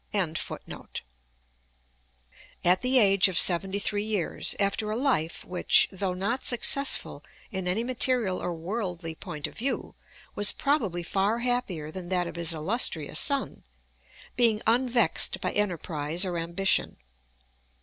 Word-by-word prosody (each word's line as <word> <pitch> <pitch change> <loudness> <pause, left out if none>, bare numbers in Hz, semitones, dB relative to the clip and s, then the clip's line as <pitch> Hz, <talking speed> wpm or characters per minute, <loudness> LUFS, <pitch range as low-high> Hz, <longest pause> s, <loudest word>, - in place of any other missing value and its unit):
] - - -28 2.5
at 180 +1 +4
the 255 +1 +3
age 200 -4 +5
of 185 -3 -3
seventy 190 +2 +4
three 205 +1 -1
years, 210 -6 -2
after 205 +1 0
a 215 - -1
life 235 - 0
which, 180 -1 +3
though 190 -1 -3
not 230 +8 -2
successful 275 +3 0 0.3
in 190 -3 -4
any 195 +6 0
material 245 -5 +1
or 180 - -3
worldly 175 -1 -4
point 150 -2 -7
of - - -7
view, 265 +5 -3 0.4
was 205 0 +5
probably 220 - -1
far 195 +5 0
happier 235 -11 -2
than 180 0 -8
that 180 -1 +1
of 170 - -7
his 170 -1 -2
illustrious 160 - 0
son, 280 -1 +1 0.7
being 230 -3 +4
unvexed 240 0 +3
by - - -2
enterprise 170 -4 -2
or 180 -2 -3
ambition. 170 +4 0
195 Hz, 130 wpm, -27 LUFS, 175-235 Hz, 2.5 s, age